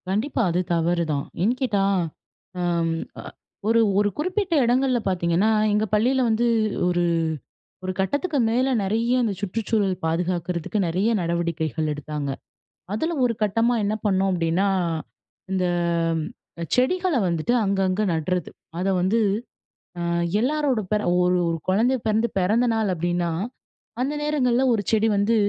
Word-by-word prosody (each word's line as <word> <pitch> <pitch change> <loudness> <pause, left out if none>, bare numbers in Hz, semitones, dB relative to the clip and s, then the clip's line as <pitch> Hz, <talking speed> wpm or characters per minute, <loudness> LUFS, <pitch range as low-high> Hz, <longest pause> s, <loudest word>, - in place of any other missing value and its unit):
கண்டிப்பா, 230 +7 0
அது 175 +1 0
தவறுதான். 165 -3 0 0.2
ஏன் 230 +5 +2
கேட்டா, 210 -7 +1 0.8
அம் 170 -2 0 0.3
அ - - -8 0.4
ஒரு 230 +1 +4 0.2
ஒரு 205 0 +3
குறிப்பிட்ட 370 +3 -1
இடங்கள்ல 250 +1 +2
பார்த்தீங்கன்னா, 180 +2 +1 0.2
எங்க 210 +1 +2
பள்ளியில 255 +5 +2
வந்து 225 +2 +2 0.4
ஒரு 175 -1 +1 0.8
ஒரு 185 0 -2
கட்டத்துக்கு 285 - 0
மேல 250 +4 +2 0.2
நறைய 230 +5 +1
அந்த 220 -3 0
சுற்றுச்சூழல் 205 -1 0
பாதுகாக்கிறதுக்கு 175 +3 -1
நெறைய 185 +7 +1
நடவடிக்கைகள் 170 -2 -1
எடுத்தாங்க. 150 -1 -5 0.6
அதில 320 +11 -1
ஒரு 235 -2 +1
கட்டமா 225 +4 +2
என்ன 205 +1 0
பண்ணோம் 195 -1 +2
அப்டின்னா, 175 +3 +1 0.8
இந்த 185 -1 +1 1.0
அ - - -2
செடிகள 360 +7 +2
வந்துட்டு 170 +6 0
அங்கங்க 195 0 +1
நட்றது. 170 +2 -2 0.3
அத 185 +2 0
வந்து, 195 +6 +2 0.8
அ - - -2 0.4
எல்லாரோட 275 -1 +1
பேர 210 0 +2 0.2
ஒரு 180 0 +3
ஒரு 165 0 -1
குழந்தை 230 +8 +3
பிறந்து, 220 +2 +2
பிறந்த 220 +7 +2
நாள் 215 -4 +1
அப்டின்னா 175 +1 -1 0.7
அந்த 280 +3 -1
நேரங்கள்ல 265 -5 +1
1 220 -3 +1
செடி 220 0 +3
வந்து 205 +3 +2
205 Hz, 130 wpm, -23 LUFS, 175-240 Hz, 1.0 s, ஒரு